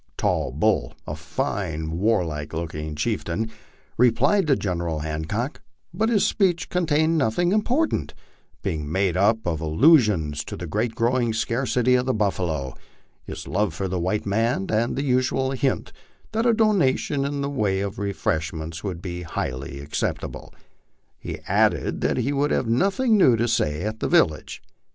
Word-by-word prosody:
Tall - - 0
Bull, - - +1
a 75 - -4
fine, 80 - -3
warlike 85 -8 0
looking 80 -2 -4
chieftain, 85 +8 -2 0.5
replied 125 - +3
to 140 - +4
General 85 -7 -2
Hancock, 80 - -3 0.3
but 220 +1 +1
his 215 -4 +3
speech 180 -5 +1
contained 160 -2 +2
nothing 145 +8 +1
important, 250 +10 0 0.5
being 75 -6 -3
made 95 -1 +1
up 110 +4 +2
of 80 -3 -1
allusions 85 - +3
to - - -6
the 90 - -5
growing 115 +4 0
scarcity 125 +2 +1
of 125 0 +2
the 130 - +1
buifalo, 85 - -1 0.5
his - - -7
love 105 +1 0
for 95 - -2
the 90 -1 -2
white 95 +5 -1
man, 110 0 +1
and 115 +2 +1
the 140 - -1
usual 130 0 +1
hint 135 0 -1 0.4
that 225 +2 +1
a 235 - +5
donation 175 - +2
in 140 0 -2
the 140 - -1
way 105 -8 0
of 100 0 -4
refreshments 80 -4 -2
would 90 -4 -4
be 90 -2 -5
highly 70 -4 -4
acceptable; 70 +2 -4 0.7
he - - -6
added - - +1
that - - +1
he 140 - 0
would 145 +1 +1
have - - +1
nothing 200 - +2
new 130 -10 +6
to 115 +1 0
say 75 -9 0
at 110 +1 -3
the - - -1
village. 75 -2 +1
110 Hz, 155 wpm, -24 LUFS, 85-135 Hz, 0.7 s, new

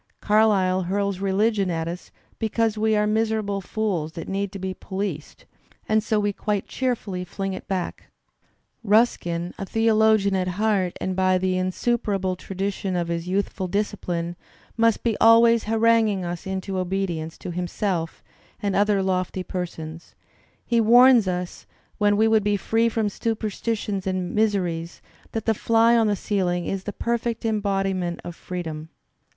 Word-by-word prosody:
Carlyle 205 -4 +3
hurls 200 -1 -1
religion 200 +1 +1
at 165 -1 -2
us 175 +2 -6 0.3
because 225 0 0
we 220 0 +2
are 210 0 +2
miserable 215 -2 0
fools 180 -6 -2
that 165 - -7
need 195 0 -2
to 200 - -7
be 190 0 -4
policed, 190 -5 -5 0.4
and 215 0 +2
so 215 -1 +1
we 205 0 0
quite 205 -1 -2
cheerfully 230 -8 -2
fling 195 +2 -4
it 185 - -8
back. 185 -2 -3 0.8
Ruskin, 180 -6 +1
a 195 - -3
theologian 220 -2 +3
at 185 -1 0
heart 205 -4 +1
and 185 0 -2
by 185 0 +3
the 185 0 0
insuperable 190 0 0
tradition 195 +1 -3
of 170 -1 -1
his 170 0 -3
youthful 190 0 -1
discipline, 180 -3 -2 0.4
must 230 -1 +2
be 230 -3 +1
always 230 0 +6
haranguing 220 -3 +2
us 175 +1 -5
into 190 0 -3
obedience 180 -4 -2
to - - -6
himself 175 -1 -3 0.4
and 200 -2 -1
other 205 -1 +3
lofty 185 0 -1
persons; 165 -3 -6 0.5
he 235 -1 +2
warns 240 -1 +6
us, 180 -1 -4 0.3
when 205 -1 +3
we 220 +1 +4
would 220 -1 +3
be 205 0 +1
free 225 +3 +1
from 220 -1 0
superstitions 210 -2 -2
and 185 -1 -2
miseries, 180 -6 0 0.3
that 225 -2 -3
the 225 - +3
fly 230 +2 +3
on 225 -2 +4
the 205 - +2
ceiling 180 -3 -1
is 195 -1 -3
the 205 - -3
perfect 235 +1 -2
embodiment 195 -5 -1
of 175 - -7
freedom. 160 -4 -6
195 Hz, 150 wpm, -24 LUFS, 185-220 Hz, 0.8 s, always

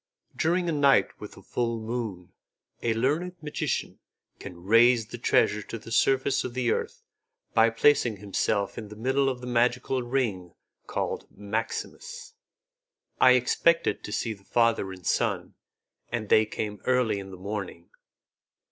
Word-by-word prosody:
During 175 +2 +1
a - - +1
night 140 -3 +4
with - - -9
a - - -14
full 115 -1 -2
moon, 110 -6 -5 0.5
a 115 -1 0
learned 155 +10 0
magician 150 -2 -3 0.4
can 85 -1 -10
raise 115 +3 +5
the 120 +2 -9
treasure 105 -2 +2
to 115 - -7
the 115 - -12
surface 135 +3 +2
of 125 -1 -6
the 125 -2 +1
earth - - -3 0.5
by 115 0 +5
placing 120 -1 +3
himself 100 0 -1
in 110 - -8
the 105 - -11
middle 135 +5 +1
of 125 -2 -4
the - - -7
magical 125 +1 +1
ring 115 -9 -2 0.3
called - - -3
maximus." 460 - -5 0.9
I 125 - +7
expected 145 +7 +2
to - - -7
see 115 +1 -2
the 100 -2 -17
father 115 -3 +1
and 90 -2 -11
son, - - 0 0.6
and 115 -3 -3
they 110 0 +5
came 105 -1 -5
early 125 -5 +2
in 95 0 -8
the 95 - -10
morning. 95 -3 -6
115 Hz, 150 wpm, -27 LUFS, 105-130 Hz, 0.9 s, I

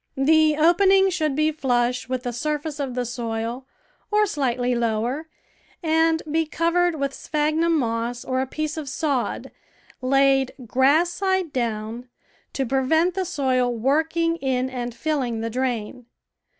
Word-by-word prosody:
The 310 +2 +4
opening 385 +4 +4
should 310 -5 -1
be 310 +1 +2
flush 250 -4 0
with 255 -1 -2
the 245 -2 -3
surface 300 +4 -3
of 265 -3 -3
the 250 -1 -1
soil, 235 +1 -4 0.4
or 425 0 +3
slightly 250 - -1
lower, 240 +6 -1 0.5
and 320 0 +2
be 320 0 +1
cov 335 +2 0
ered 350 -1 +2
with 280 -2 -2
sj)hagnum 310 +4 0
moss 235 -3 -1
or 260 0 0
a 265 - -2
piece 310 +3 -4
of 300 -3 -5
sod, 280 -3 -2 0.5
laid 270 0 +3
grass 280 +9 +3
side 375 -3 -1
down, 230 0 -3 0.4
to 270 - -1
prevent 275 +8 +2
the 380 +1 -2
soil 260 -7 +1
working 320 +7 +1
in 260 -3 -1
and 245 -2 -4
filling 260 -8 -1
the 230 0 -3
drain. 245 -1 -3
270 Hz, 145 wpm, -23 LUFS, 245-320 Hz, 0.5 s, The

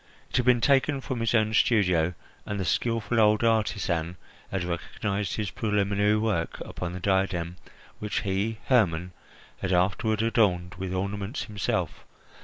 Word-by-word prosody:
It - - 0
had 125 -1 +1
been 125 -2 +5
taken 135 +3 +3
from 130 -2 -4
his 115 +1 +1
own 110 -1 +2
studio, 90 -7 +3 0.3
and 105 -1 -4
the 95 - -1
skilful 115 +3 0
old 105 0 +4
artisan 100 -6 0 0.3
had 95 -2 -2
recognised 100 +3 -3
his 105 -3 -3
preliminary 105 -1 +1
work 105 -6 -1
upon 90 -1 -5
the 90 - -5
diadem 95 -3 0 0.4
which 105 -1 -2
he, 100 +3 -1
Hermon, 90 -8 +2 0.5
had 95 - -1
afterward 100 +4 +1
adorned 95 -6 +2
with 95 -1 -3
ornaments 100 +5 -3
himself. 105 -2 -2
100 Hz, 145 wpm, -27 LUFS, 90-110 Hz, 0.5 s, been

